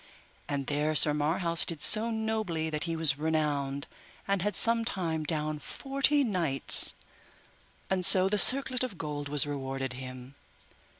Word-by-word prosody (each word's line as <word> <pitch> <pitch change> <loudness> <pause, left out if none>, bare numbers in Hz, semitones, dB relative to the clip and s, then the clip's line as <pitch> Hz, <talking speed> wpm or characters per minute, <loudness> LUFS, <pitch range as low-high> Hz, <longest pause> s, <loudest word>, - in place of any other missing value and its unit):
And 140 -1 -5
there 150 +2 -3
Sir 150 +1 +4
Marhaus 165 +3 -1
did 165 -3 -3
so 220 +2 +3
nobly 220 -8 -4
that 150 +1 -4
he 165 -1 -5
was 155 -4 +1
renowned, 145 -3 -3 0.4
and 200 -2 -2
had 205 0 -4
sometime 190 -9 0
down 155 -1 -4
forty 275 - -1
knights, 170 - +3 0.9
and 190 -1 -3
so 185 +1 +8
the 205 +1 0
circlet 260 0 +4
of 230 -8 -7
gold 145 -3 -7
was 145 0 +3
rewarded 135 -2 -6
him. 130 0 -11
160 Hz, 140 wpm, -27 LUFS, 145-205 Hz, 0.9 s, so